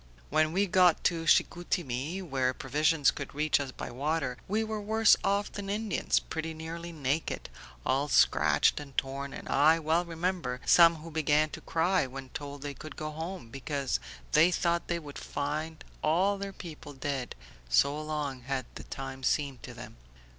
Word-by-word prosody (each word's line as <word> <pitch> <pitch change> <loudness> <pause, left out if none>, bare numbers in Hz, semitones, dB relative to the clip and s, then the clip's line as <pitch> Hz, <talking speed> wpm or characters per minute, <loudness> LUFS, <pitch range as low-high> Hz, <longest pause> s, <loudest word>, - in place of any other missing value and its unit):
"When 155 +1 +3
we 195 +4 +2
got 180 -3 +4
to 165 -2 +1
Chicoutimi 170 0 +1
where 130 -5 0
provisions 150 +2 +2
could 140 -1 -7
reach 150 0 +2
us 140 -2 -3
by - - -7
water 135 0 -1
we 215 +3 +1
were 220 -1 -3
worse 220 +1 +5
off 200 +1 +1
than 200 -1 -6
Indians, 210 -2 +1
pretty 160 0 -5
nearly 165 +2 -6
naked, 150 0 -2 0.4
all 135 +3 +1
scratched 150 - +4
and 140 -3 -11
torn, 140 +1 -2
and - - -8
I 155 +4 +5
well 165 +2 +1
remember 170 -6 -2
some 170 -1 +7
who 165 - -8
began 155 0 +2
to - - -7
cry 170 -2 +1
when 130 0 -8
told 145 +1 -7
they 145 -1 -4
could 155 +2 -10
go 155 0 -4
home, 160 -3 -6
because 135 - -2 0.3
they 165 +3 +6
thought 170 -1 0
they 170 - 0
would 150 -4 -8
find 155 +2 -3 0.2
all 190 +6 +2
their 200 0 -4
people 155 -5 -9
dead, 135 -2 -3 0.3
so 140 - +3
long 150 -4 -3
had 130 0 -3
the - - -8
time 135 -1 -6
seemed 135 -1 0
to - - -9
them. - - -10
155 Hz, 170 wpm, -30 LUFS, 140-170 Hz, 0.4 s, some